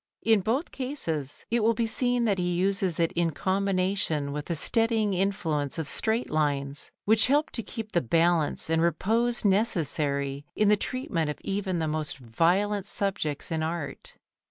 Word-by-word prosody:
In 220 Hz, -1 st, +4 dB
both 240 Hz, -, -1 dB
cases 165 Hz, -, -4 dB
it 235 Hz, -, +3 dB
will 225 Hz, +1 st, +3 dB
be 230 Hz, +1 st, 0 dB
seen 245 Hz, +1 st, +1 dB
that 200 Hz, -4 st, +1 dB
he 175 Hz, 0 st, 0 dB
uses 190 Hz, -1 st, +1 dB
it 165 Hz, -1 st, +2 dB
in 170 Hz, -1 st, +1 dB
combination 185 Hz, -4 st, 0 dB
with 145 Hz, +1 st, -4 dB
the 170 Hz, -, -2 dB
steadying 225 Hz, +5 st, +1 dB
influence 170 Hz, -7 st, -1 dB
of 160 Hz, -3 st, -3 dB
straight 225 Hz, +8 st, 0 dB
lines, 145 Hz, -2 st, -1 dB, 0.2 s
which 220 Hz, +2 st, +5 dB
help 290 Hz, +3 st, +2 dB
to 230 Hz, -, -1 dB
keep 220 Hz, 0 st, -7 dB
the 175 Hz, -, +2 dB
balance 165 Hz, +4 st, +1 dB
and 160 Hz, 0 st, +1 dB
repose 225 Hz, +8 st, +1 dB
necessary 145 Hz, -, 0 dB
in 210 Hz, -1 st, +3 dB
the 210 Hz, -, +6 dB
treatment 200 Hz, -, -2 dB
of 150 Hz, -, -4 dB
even 195 Hz, -2 st, -2 dB
the 160 Hz, -1 st, -1 dB
most 155 Hz, -1 st, -2 dB
violent 180 Hz, -, +1 dB
subjects 190 Hz, -10 st, -3 dB
in 160 Hz, -1 st, 0 dB
art. 160 Hz, -3 st, -4 dB
185 Hz, 165 wpm, -27 LUFS, 155-215 Hz, 0.2 s, the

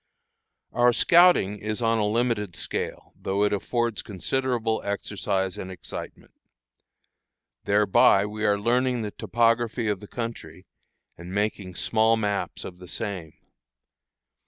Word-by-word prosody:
Our 120 Hz, 0 st, +4 dB
scouting 170 Hz, -, +5 dB
is 105 Hz, +1 st, -3 dB
on 115 Hz, -1 st, +2 dB
a 105 Hz, -, +1 dB
limited 110 Hz, -4 st, 0 dB
scale, -, -, -5 dB
though 100 Hz, +2 st, -1 dB
it 105 Hz, -, +2 dB
affords 120 Hz, +2 st, -1 dB
considerable 115 Hz, -, -1 dB
exercise 95 Hz, -2 st, -2 dB
and 95 Hz, -, -6 dB
excitement. 95 Hz, -, -9 dB, 1.3 s
Thereby 105 Hz, 0 st, +4 dB
we 105 Hz, +1 st, -5 dB
are 105 Hz, -1 st, +3 dB
learning 125 Hz, +2 st, +1 dB
the 105 Hz, -, -4 dB
topography 115 Hz, +2 st, +1 dB
of 105 Hz, -2 st, -1 dB
the 105 Hz, -, -11 dB
country, 100 Hz, -8 st, -6 dB, 0.5 s
and 85 Hz, +2 st, -9 dB
making 100 Hz, -2 st, -2 dB
small 110 Hz, +3 st, +2 dB
maps 105 Hz, -2 st, -2 dB
of 90 Hz, -1 st, -9 dB
the 90 Hz, -, -11 dB
same. 95 Hz, -5 st, -4 dB
105 Hz, 125 wpm, -25 LUFS, 100-115 Hz, 1.3 s, scouting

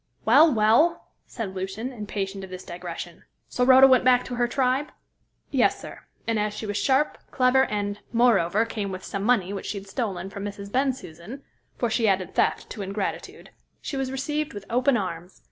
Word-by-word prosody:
"Well! 295 Hz, +8 st, +7 dB
well!" 235 Hz, +10 st, +3 dB, 0.2 s
said 220 Hz, -6 st, -5 dB
Lucian, 195 Hz, +7 st, -5 dB
impatient 200 Hz, -3 st, -5 dB
of 190 Hz, -, -8 dB
this 185 Hz, 0 st, -8 dB
digression. 175 Hz, -1 st, -8 dB, 0.3 s
"So 250 Hz, -, 0 dB
Rhoda 260 Hz, +1 st, +8 dB
went 260 Hz, -2 st, +5 dB
back 250 Hz, -1 st, +4 dB
to 250 Hz, -, -6 dB
her 240 Hz, 0 st, +2 dB
tribe?" 260 Hz, +3 st, 0 dB, 0.6 s
"Yes, -, -, +2 dB
sir; -, -, -10 dB, 0.3 s
and 225 Hz, -2 st, 0 dB
as 210 Hz, 0 st, -1 dB
she 220 Hz, -, -5 dB
was 205 Hz, -1 st, -3 dB
sharp, 275 Hz, +5 st, +1 dB
clever, 260 Hz, 0 st, +3 dB
and, 205 Hz, -1 st, -3 dB
moreover, 225 Hz, -4 st, +3 dB
came 210 Hz, -3 st, -4 dB
with 185 Hz, 0 st, -6 dB
some 195 Hz, -, -4 dB
money 200 Hz, -4 st, +2 dB
which 195 Hz, -, -5 dB
she 210 Hz, -, -3 dB
had 195 Hz, -, -8 dB
stolen 195 Hz, -4 st, -4 dB
from 200 Hz, 0 st, -7 dB
Mrs. 200 Hz, 0 st, -7 dB
Bensusan 255 Hz, -, -3 dB, 0.3 s
for 240 Hz, -2 st, -1 dB
she 230 Hz, -1 st, +2 dB
added 185 Hz, -2 st, 0 dB
theft -, -, +1 dB
to 210 Hz, -, -6 dB
ingratitude 195 Hz, +1 st, -5 dB, 0.3 s
she -, -, -6 dB
was 270 Hz, -1 st, -2 dB
received 295 Hz, +1 st, -3 dB
with 200 Hz, -1 st, -7 dB
open 250 Hz, +2 st, +3 dB
arms. 180 Hz, -2 st, -5 dB
215 Hz, 185 wpm, -25 LUFS, 195-255 Hz, 0.6 s, Rhoda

